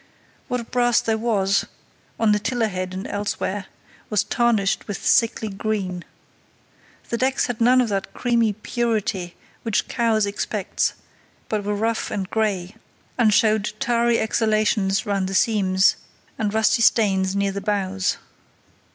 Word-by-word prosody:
What 245 -3 -4
brass 240 -2 +3
there 225 - 0
was, 200 -4 +1 0.6
on 225 -2 +3
the 210 - +3
tiller 230 +1 0
head 185 -1 -4
and 190 - -5
elsewhere, 205 -1 -3 0.4
was 210 -3 +2
tarnished 230 -5 +1
with 205 - -5
sickly 225 -1 +3
green. 195 -3 -3 1.1
The 235 - -2
decks 260 +1 +1
had 245 -2 -4
none 250 +2 +5
of 245 -3 +2
that 195 -1 -2
creamy 235 -3 +1
purity 215 -5 -2 0.3
which 225 -3 -1
Cowes 225 -3 +1
expects, 200 0 -2 0.5
but 215 -2 -1
were 205 +1 -1
rough 225 +2 -1
and 195 -2 -3
grey, 205 -4 -1 0.5
and 225 -3 +5
showed 215 0 +2
tarry 235 -2 +2
exhalations 215 -2 +1
round 200 -2 0
the 190 - -3
seams 190 -3 +3 0.4
and 210 -2 -1
rusty 220 +2 +2
stains 195 -4 +3
near 200 0 +1
the 200 +1 -5
bows. 195 -2 -1
215 Hz, 140 wpm, -22 LUFS, 195-230 Hz, 1.1 s, none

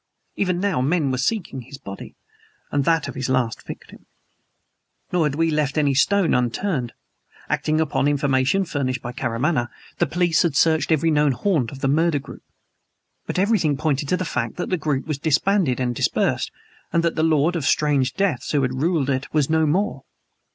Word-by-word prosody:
Even 180 -3 0
now 195 -8 0
men 145 0 +1
were 130 - -1
seeking 165 - -2
his 135 +3 -11
body, 100 -8 -9 0.6
and 140 -1 0
that 165 -2 +2
of 140 - -6
his 130 0 -3
last 125 -3 0
victim. - - -10 1.0
Nor 170 -4 +2
had 140 - -3
we 165 +1 +1
left 150 -1 0
any 145 -2 +3
stone 195 +7 +3
unturned. 125 - -1 0.6
Acting 155 0 0
upon 155 -2 +1
information 140 +5 +1
furnished 130 -6 -2
by 120 - -4
Karamaneh, 125 +2 -1 0.3
the - - +2
police 175 -3 +2
had 165 -5 0
searched 160 +2 +3
every 160 +1 +3
known 150 -2 +3
haunt 135 - 0
of 135 - -10
the - - +1
murder 160 +2 +2
group. 140 - -9 0.9
But - - -3
everything 185 -7 +2
pointed 145 -2 -1
to 180 - +2
the 185 - -3
fact - - -2
that 180 - -4
the - - +3
group 145 -4 -1
was 150 -3 -3
disbanded 160 -1 +1
and 125 -1 0
dispersed; - - 0 0.4
that 170 0 +1
the 155 - -1
lord 160 +1 +2
of 160 -5 -2
strange 140 -4 +2
deaths 185 -10 -1
who 145 -2 +2
had 130 +1 -2
ruled 160 -4 +1
it 130 +1 -3
was 150 -1 +1
no 160 -1 +3
more. 195 +8 0
150 Hz, 185 wpm, -22 LUFS, 135-165 Hz, 1.0 s, any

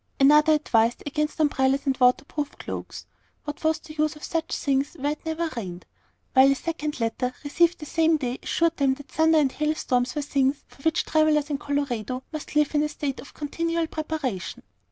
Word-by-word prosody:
Another 300 +3 +6
advised 235 -6 +2
against 300 +2 -2
umbrellas 275 -2 +2
and 270 -1 +1
water 250 +2 +4
proof 295 -1 -4
cloaks, - - -7 0.4
what 295 +1 -7
was 315 0 +2
the 310 0 -12
use 305 0 0
of 300 - -14
such 330 -1 -2
things 280 +2 0
where 285 +2 0
it 300 - -7
never 325 +1 -1
rained? 180 -6 -6 0.5
while 265 +1 +7
a - - +2
second 305 -1 -4
letter, 245 +2 -1
received 340 +4 +2
the 305 - -8
same 320 +1 +2
day, 255 -3 -3
assured 335 0 +1
them 270 -2 +2
that 285 0 -13
thunder 320 0 +4
and 285 -4 +3
hail 305 +2 0
storms 250 -3 0
were 295 - -1
things 275 0 0
for - - -19
which 320 +3 +1
travellers 310 -1 +2
in 280 - -1
Colorado 260 -4 -2
must 305 -1 -6
live 300 0 +3
in 295 - +3
a 300 - 0
state 285 -2 -4
of - - -12
continual 330 +3 -1
preparation. 310 - -4
295 Hz, 195 wpm, -25 LUFS, 265-310 Hz, 0.5 s, while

